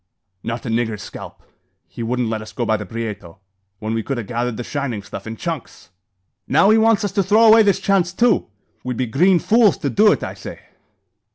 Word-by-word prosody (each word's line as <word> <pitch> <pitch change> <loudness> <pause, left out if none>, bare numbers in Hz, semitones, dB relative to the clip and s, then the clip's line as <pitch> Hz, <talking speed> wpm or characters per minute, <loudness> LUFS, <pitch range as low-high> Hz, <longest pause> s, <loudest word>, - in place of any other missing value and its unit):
"Not 115 +1 -5
a - - -3
niggur's 115 -3 -2
scalp. - - -10 0.4
He - - -9
wouldn't 120 +1 -1
let 110 -1 -3
us 110 - -11
go 120 - -2
by 110 - +1
the 105 -2 -5
Prieto, 105 -5 -6 0.4
when 110 +2 -4
we 115 - -1
kud 135 +4 -4
'a 120 - -3
gathered 120 +2 -3
the 120 - -4
shining 125 -7 -4
stuff 100 +1 -9
in 110 - -5
chunks." 160 - -6 0.6
"Now 180 +9 +4
he 220 - +5
wants 225 -1 +3
us 205 - -2
to 200 - +1
throw 210 +4 +3
away 225 0 +8
this 205 -2 +2
chance 190 -3 +1
too. 230 +2 +2 0.4
We'd 125 -2 -4
be 130 - 0
green 175 +11 +3
fools 220 +3 +3
to - - -3
do 210 +1 +5
it, - - -1
I - - -5
say." - - -9
125 Hz, 215 wpm, -20 LUFS, -, 0.6 s, away